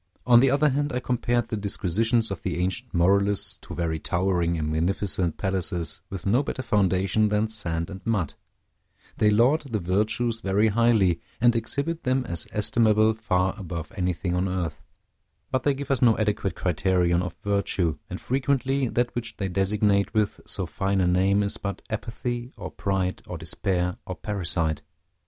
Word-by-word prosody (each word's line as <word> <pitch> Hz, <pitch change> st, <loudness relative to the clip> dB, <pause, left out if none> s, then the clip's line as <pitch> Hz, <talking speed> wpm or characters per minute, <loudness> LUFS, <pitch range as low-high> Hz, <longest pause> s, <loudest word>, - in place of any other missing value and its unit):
On 120 Hz, -1 st, +7 dB
the 135 Hz, +2 st, +4 dB
other 145 Hz, +3 st, +3 dB
hand, 145 Hz, +2 st, 0 dB
I 125 Hz, -, 0 dB
compared 120 Hz, -2 st, 0 dB
the -, -, -2 dB
disquisitions 110 Hz, +3 st, +1 dB
of 100 Hz, -, -4 dB
the -, -, -3 dB
ancient 95 Hz, +8 st, -2 dB
moralists 100 Hz, +3 st, +2 dB
to -, -, -9 dB
very 80 Hz, -2 st, -1 dB
towering 85 Hz, -1 st, 0 dB
and 75 Hz, -1 st, -2 dB
magnificent 90 Hz, +1 st, -1 dB
palaces 90 Hz, -4 st, -2 dB
with 95 Hz, -4 st, -7 dB
no 115 Hz, +7 st, +3 dB
better 135 Hz, -2 st, -4 dB
foundation 100 Hz, -1 st, +2 dB
than 105 Hz, +1 st, +1 dB
sand 85 Hz, -6 st, -2 dB
and 95 Hz, -1 st, -9 dB
mud: 105 Hz, -10 st, -1 dB, 0.9 s
they 105 Hz, -, +4 dB
laud 120 Hz, +9 st, +4 dB
the 110 Hz, -, +1 dB
virtues 105 Hz, +5 st, 0 dB
very 105 Hz, +1 st, +2 dB
highly, 105 Hz, -6 st, +3 dB, 0.2 s
and 120 Hz, 0 st, +4 dB
exhibit 140 Hz, +9 st, -1 dB
them 130 Hz, 0 st, 0 dB
as 85 Hz, -8 st, -1 dB
estimable 110 Hz, 0 st, +3 dB
far 95 Hz, -4 st, 0 dB
above 85 Hz, -4 st, -6 dB
anything 90 Hz, -2 st, -1 dB
on 90 Hz, +2 st, 0 dB
earth; 90 Hz, -3 st, -3 dB, 0.7 s
but 130 Hz, -1 st, +1 dB
they 140 Hz, +1 st, +1 dB
give 140 Hz, 0 st, -5 dB
us 135 Hz, -, +1 dB
no 115 Hz, -3 st, +5 dB
adequate 105 Hz, -2 st, -1 dB
criterion 90 Hz, 0 st, +1 dB
of 90 Hz, -2 st, -5 dB
virtue, 100 Hz, -5 st, 0 dB
and -, -, -5 dB
frequently 135 Hz, 0 st, 0 dB
that 120 Hz, +1 st, 0 dB
which 120 Hz, -1 st, -4 dB
they 95 Hz, -2 st, -2 dB
designate 100 Hz, +2 st, +1 dB
with 105 Hz, -1 st, 0 dB
so -, -, -2 dB
fine 95 Hz, 0 st, -1 dB
a 90 Hz, -, +3 dB
name 95 Hz, +3 st, +3 dB
is 100 Hz, -, -1 dB
but 100 Hz, -1 st, -5 dB
apathy, 120 Hz, +3 st, -4 dB
or -, -, -7 dB
pride, 95 Hz, -2 st, -2 dB
or -, -, -5 dB
despair, 90 Hz, -2 st, -1 dB
or 90 Hz, -, -4 dB
parricide. 85 Hz, -7 st, -1 dB
100 Hz, 170 wpm, -25 LUFS, 90-115 Hz, 0.9 s, On